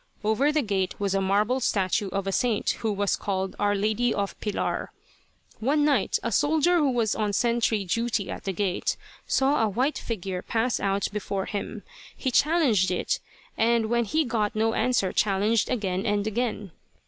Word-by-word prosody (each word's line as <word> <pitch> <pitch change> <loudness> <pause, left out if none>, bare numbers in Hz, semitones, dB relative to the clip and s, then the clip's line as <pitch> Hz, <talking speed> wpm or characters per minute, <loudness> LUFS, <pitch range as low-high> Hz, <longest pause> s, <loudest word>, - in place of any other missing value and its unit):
Over 220 +8 +2
the 305 -1 +1
gate 195 -4 -1
was 200 -1 0
a 195 - +1
marble 205 +6 +2
statue 200 -3 0
of 195 +1 -2
a 195 - -1
saint, 230 +1 +1
who 220 - -1
was 200 -1 0
called 190 -2 -3
'Our 205 0 +2
Lady 215 +4 +1
of 200 -1 -2
Pilar.' 210 -2 -2 0.7
"One 290 +6 +2
night 285 -4 +2
a 230 - -1
soldier 315 - +3
who 295 -4 +3
was 235 -4 +1
on 210 -2 -1
sentry 230 -2 +1
duty 230 +1 -1
at - - -7
the 195 - 0
gate 190 -1 -1 0.3
saw 270 +1 +2
a 220 - +2
white 255 +9 0
figure 190 -5 -4
pass 230 +4 0
out 195 0 0
before 200 -2 -3
him. 205 - -5 0.3
He 260 - -1
challenged 275 - +3
it, 180 - -1 0.4
and 225 0 +2
when 235 0 +2
he 310 +9 +1
got 215 -4 -1
no 225 +1 +1
answer 245 -7 +1
challenged 210 +2 +2
again 195 -5 -1
and 205 -1 +1
again. 220 -3 -2
215 Hz, 175 wpm, -26 LUFS, 195-245 Hz, 0.7 s, soldier